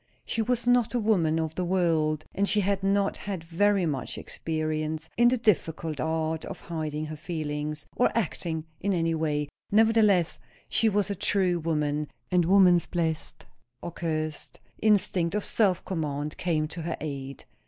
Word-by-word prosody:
She 225 - -1
was 240 +1 0
not 245 -1 +3
a - - +2
woman 180 -8 +2
of 160 -1 -2
the 180 - -2
world, 165 -4 +1
and 200 +1 +1
she 210 - +3
had 200 0 0
not 195 0 +1
had 195 -5 -5
very 190 +3 +2
much 140 -6 -3
experience 155 0 -3
in 240 +1 +5
the 250 +1 +3
difficult 165 - 0
art 160 +1 -1
of - - -7
hiding 155 -2 -4
her 155 0 -6
feelings, 150 -1 -4
or 245 - +3
acting 165 -6 -2
in 200 0 0
any 165 -1 +1
way; 150 -2 -1 0.2
nevertheless 215 -5 +4 0.3
she 225 - +3
was 205 0 +1
a - - +1
true 190 -3 +1
woman, 150 -2 -1 0.2
and 180 -2 +3
woman's 180 -2 +5
blessed 160 -3 -3 0.4
or 175 - -4
cursed? 155 -2 -4 0.2
instinct 195 -4 +2
of 210 - -1
self 190 -5 +1
command 150 -4 -3
came 155 -3 0
to 165 - -6
her 165 0 -3
aid. 140 -3 -6
165 Hz, 165 wpm, -27 LUFS, 155-200 Hz, 0.4 s, in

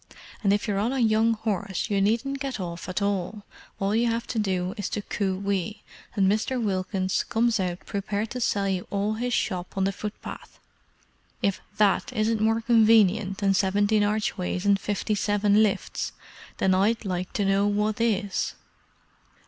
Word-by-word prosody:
And 200 - +4
if 205 +1 +1
you're 200 -2 0
on 230 +5 0
a - - -1
young 225 0 +3
horse 205 -2 -2
you 200 -1 +2
needn't 235 +7 0
get 270 -4 -4
off 170 -1 -5
at 185 +2 -1
all—all 200 0 -3
you 235 +1 +3
have 230 +1 -1
to 230 - -1
do 185 -3 -1
is 205 - -3
to 210 - -3
coo 200 0 -2
ee, 210 +2 -2 0.3
and 195 -2 +3
Mr. 220 +6 +1
Wilkins 190 -3 -1
comes 230 -1 +1
out 180 -1 -3
prepared 205 +2 -3
to 250 - -4
sell 200 -3 +1
you 185 -2 -2
all 205 +1 0
his 245 +3 -2
shop 185 -5 -2
on 190 - +2
the 195 - +2
footpath. 210 +2 -8 0.9
If 200 -1 +1 0.2
that 210 +6 +2
isn't 220 -1 +1
more 225 +1 +2
convenient 220 -4 +4
than 195 -1 +2
seventeen 205 +2 +2
archways 205 -3 -1
and 200 -1 +4
fifty 210 +1 -2
seven 205 0 +3
lifts, 210 -3 -1 0.4
then 190 - +2
I'd 210 +4 +2
like 185 -1 -3
to 205 - 0
know 195 +1 +3
what 210 +2 0
is!" 205 -4 0
205 Hz, 170 wpm, -26 LUFS, 195-220 Hz, 0.9 s, And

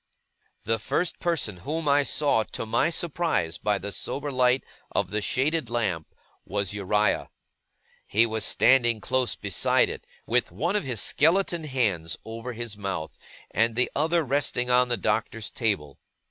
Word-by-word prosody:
The 115 0 0
first 175 +10 -1
person 150 - 0
whom 150 - -3
I 145 0 +5
saw, 140 -4 +2
to - - -3
my 120 +8 +2
surprise, 160 - -1
by 105 -1 +1
the 100 +1 -5
sober 145 +7 -4
light 130 0 +3 0.3
of - - -1
the 105 +1 -1
shaded 135 +5 0
lamp, 100 -10 -1 0.4
was 100 -1 -2
Uriah. 105 +1 +1 0.8
He 110 +3 +3
was 110 -1 -2
standing 120 -3 +4
close 125 +1 0
beside - - +2
it, - - -9 0.2
with - - +1
one 160 - -1
of 210 - 0
his 125 -5 -1
skeleton 170 +1 +2
hands 100 - 0
over 115 +2 -6
his 115 -2 -5
mouth, 95 -6 -4 0.4
and 115 0 +1
the 125 - +2
other 165 +3 +2
resting 130 -3 0
on 125 0 +4
the 120 - +1
Doctor's 110 +1 -1
table. 90 - -2
120 Hz, 155 wpm, -26 LUFS, 105-140 Hz, 0.8 s, I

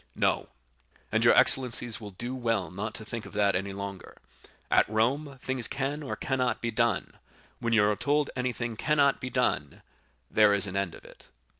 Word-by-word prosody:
"No; - - 0 0.6
and - - +2
your - - +6
excellencies 120 -3 +3
will 105 - -7
do 120 +6 -6
well 115 -7 -1
not 105 +4 -5
to 110 - -7
think 115 0 -6
of - - -13
that 100 -1 +2
any 100 +2 -2
longer; 100 -1 -7 0.5
at - - +4
Rome 135 +6 0
things 130 -3 +1
can 140 +2 -3
or 140 - -4
cannot 125 -3 -1
be 115 - -2
done; 115 -2 0 0.4
when 115 -1 -2
you 105 -2 +4
are 105 - +2
told 145 +5 0
anything 125 -2 -2
cannot 145 0 +2
be 125 - -4
done, 125 0 -1 0.5
there 105 -1 +5
is 100 0 +1
an 95 -1 -6
end 100 -4 -1
of - - -15
it." - - -16
115 Hz, 185 wpm, -28 LUFS, 105-130 Hz, 0.6 s, your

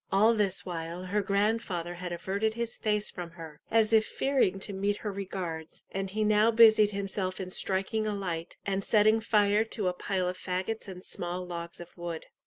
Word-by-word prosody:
All 215 +4 +5
this 200 -4 0
while, 170 0 -5
her 200 +3 0
grandfather 200 -3 0
had 175 0 -6
averted 200 +5 -1
his 235 -1 -1
face 210 -1 0
from 175 -2 -6
her, 160 -3 -9
as 225 0 +3
if 220 -1 +6
fearing 265 -9 +1
to 200 - -3
meet 200 +2 0
her 210 - 0
regards, 180 -5 -5
and 195 0 -3
he 215 +3 -1
now 215 +1 +4
busied 220 -2 +7
himself 195 -2 -3
in 185 -1 -5
striking 195 +4 0
a 210 - -1
light 175 -4 -4
and 195 0 -1
setting 215 +1 +4
fire 210 -1 +3
to 210 -3 -2
a - - -2
pile 185 0 -1
of 180 0 -4
fagots 190 +4 -3
and 185 -1 -8
small 180 0 -4
logs 170 -1 -6
of 175 0 -11
wood. 170 -2 -5
195 Hz, 190 wpm, -29 LUFS, 180-215 Hz, -, busied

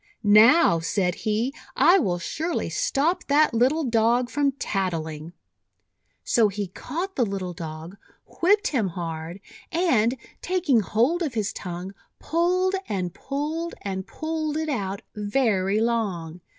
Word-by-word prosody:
"Now," 215 - +6
said 180 +2 0
he, 220 +7 -1 0.2
"I 375 +3 +6
will 180 - 0
surely 320 - -3
stop 340 - 0
that 295 -1 +4
little 260 +8 +2
Dog 235 0 +2
from 280 +1 +1
tattling!'1 165 - -3 0.9
So 230 -3 +3
he 200 -1 -4
caught 350 - -5
the 250 - +2
little 195 -4 -3
Dog, 165 +2 -8 0.4
whipped 410 +4 +4
him 235 -9 0
hard, 165 0 -5 0.3
and, 265 -9 +2 0.2
taking 350 -9 +2
hold 235 - +1
of 295 -8 -2
his 210 -3 -1
tongue, 180 +2 -6 0.2
pulled, 360 +3 +1 0.2
and 185 -4 -2
pulled, 305 +8 -4
and 190 -1 -4
pulled 315 -1 -3
it 315 0 -2
out 200 -7 -3
very 205 -2 +1
long. 195 -8 -1
225 Hz, 130 wpm, -25 LUFS, 190-305 Hz, 0.9 s, Now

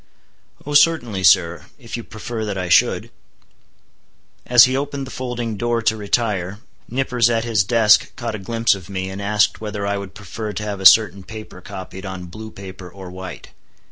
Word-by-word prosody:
"Oh 145 - -4
certainly, 145 - +3
sir, 85 -1 +4
if 120 -4 -8
you 120 - -5
prefer 110 +1 -6
that 105 -2 -3
I 90 -1 -3
should." - - +3 1.4
As 120 -1 +8
he 130 +1 -1
opened 140 0 -3
the 130 - -10
folding 120 -4 -4
door 120 +1 -1
to 110 0 +2
retire, 105 -3 -1 0.3
Nippers 125 -2 +1
at 115 -1 +1
his 115 -4 +2
desk 110 0 +4
caught 120 -3 -4
a 110 - -5
glimpse 115 +3 +1
of 95 -2 -9
me, 95 -1 -4
and 95 +1 -6
asked 105 +2 +1
whether 105 -2 -4
I 100 0 -1
would 100 -1 -9
prefer 105 +1 -6
to 105 - -4
have 100 -2 -4
a 95 - +9
certain 100 -3 +5
paper 110 -2 -10
copied 95 +1 -8
on 95 -1 -6
blue 110 0 -8
paper 95 -3 -10
or 95 0 -10
white. 95 -3 -9
105 Hz, 185 wpm, -20 LUFS, 95-115 Hz, 1.4 s, a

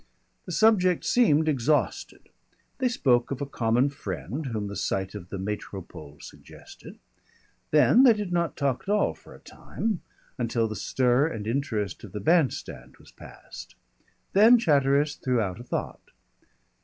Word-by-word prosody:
The - - -6
subject 185 -6 +3
seemed 160 -11 +3
exhausted. 145 0 -1 0.5
They 260 - +2
spoke 125 - +1
of 135 - -4
a 140 - -3
common 120 0 +1
friend 135 - -6
whom 110 -4 -3
the 100 0 -6
sight 95 -1 -2
of 95 -4 -9
the 100 - -5
Métropole 95 -6 -7
suggested. - - -13 0.7
Then 155 - +5
they 255 -3 +7
did 210 -4 -5
not 170 -2 -1
talk 135 -3 -1
at - - -11
all 210 0 +2
for - - -16
a - - -16
time, 215 -5 -5 0.4
until 115 -1 0
the 110 - -6
stir 125 +6 +1
and 110 -9 -6
interest 110 -5 -3
of 100 -4 -11
the 105 - -4
band 160 - +3
stand - - -10
was - - -19
passed. - - -13 0.6
Then 220 +5 +7
Chatteris 145 - +2
threw 125 -2 0
out 95 -3 -3
a - - -8
thought. 125 - -5
135 Hz, 155 wpm, -26 LUFS, 110-165 Hz, 0.7 s, they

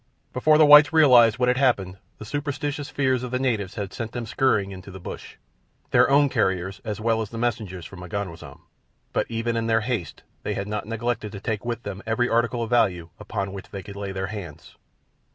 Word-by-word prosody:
Before 150 +5 +4
the 155 - +7
whites 145 -1 +9
realized 125 -8 +6
what 125 -1 +1
had 125 0 +2
happened 95 -9 +1 0.2
the 110 - -9
superstitious 145 +2 -3
fears 130 -3 +1
of 125 - -5
the 125 - -1
natives 115 -8 -1
had 100 -4 -5
sent 115 0 -5
them 120 -1 -4
scurrying 110 -4 +1
into 95 0 -10
the 95 0 -9
bush—their 125 +7 -3
own 140 +1 +5
carriers 95 -6 -1
as 105 -3 -4
well 110 0 +1
as 110 - -4
the 115 - -8
messengers 105 -7 -3
from 95 - -10
M'ganwazam—but 90 -1 -6
even 115 0 -2
in 115 0 -1
their 110 0 +2
haste 115 -7 -4 0.2
they - - -3
had 100 - -4
not 105 0 -4
neglected 115 -1 -2
to 100 - -6
take 105 +1 -3
with 120 -1 -4
them 100 -1 -6
every 115 +2 +1
article 120 0 +1
of 115 - -6
value 90 -9 +1
upon 100 -2 -4
which 100 - -9
they 100 -2 -7
could 100 - -10
lay 100 -1 -5
their 95 0 -3
hands. 85 -8 -9
115 Hz, 205 wpm, -24 LUFS, 100-125 Hz, 0.2 s, whites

